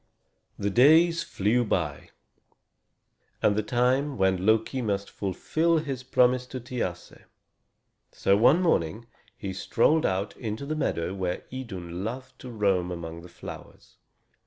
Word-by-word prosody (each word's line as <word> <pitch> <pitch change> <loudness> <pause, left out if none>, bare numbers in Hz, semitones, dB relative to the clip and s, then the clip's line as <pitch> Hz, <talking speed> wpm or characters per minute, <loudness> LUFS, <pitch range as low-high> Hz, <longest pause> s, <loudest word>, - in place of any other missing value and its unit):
The 100 0 -1
days 160 - +5
flew 110 +1 +1
by, 75 - -2 1.3
and 100 - +3
the 110 - +1
time 125 +5 +2
came - - -8
when 95 0 +1
Loki 110 +4 +2
must 100 -3 -2
fulfill 160 - 0
his 140 -5 -3
promise 125 0 +2
to 130 - -6
Thiasse. 120 -8 -5 0.9
So 100 - +2
one 135 - +5
morning 110 - +1 0.3
he 95 -2 -5
strolled 150 +11 +2
out 95 +2 -2
into 110 +3 -4
the 155 +2 -2
meadow 90 - -1
where 95 -2 -3
Idun 95 -9 -6
loved 130 +3 -6
to 130 - -9
roam 100 -6 +1
among 85 -1 -6
the 90 - -12
flowers. - - -11
110 Hz, 135 wpm, -27 LUFS, 95-130 Hz, 1.3 s, days